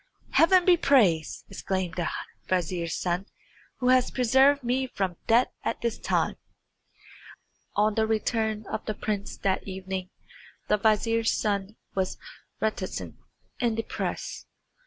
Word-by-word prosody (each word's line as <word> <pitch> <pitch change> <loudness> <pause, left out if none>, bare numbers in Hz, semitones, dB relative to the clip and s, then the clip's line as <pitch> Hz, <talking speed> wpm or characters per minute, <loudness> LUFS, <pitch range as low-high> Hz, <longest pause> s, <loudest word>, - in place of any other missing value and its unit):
"Heaven 360 +2 +5
be 360 -2 +6
praised," 200 - +3
exclaimed 190 -3 -3
the 175 0 -1 0.4
vizier's 175 -2 -1
son, 180 +2 -1 0.5
"who 250 -1 +1
has 255 -1 +5
preserved 265 +3 +4
me 255 +2 0
from 190 -7 -2
death 235 +2 +4
at - - -2
this 235 -1 -1
time!" - - 0 1.4
On 210 +1 +3
the 220 +1 +1
return 220 -1 0
of 220 - -4
the 215 - -1
prince 205 -2 -3
that 195 0 -1
evening 190 -1 -4 0.6
the 210 - +4
vizier's 225 +2 +2
son 200 -1 -1 0.2
was 190 -1 -1 0.4
very 220 - +2
reticent 185 -3 -6 0.4
and 235 -3 +1
depressed. 225 - -4
215 Hz, 130 wpm, -27 LUFS, 190-240 Hz, 1.4 s, be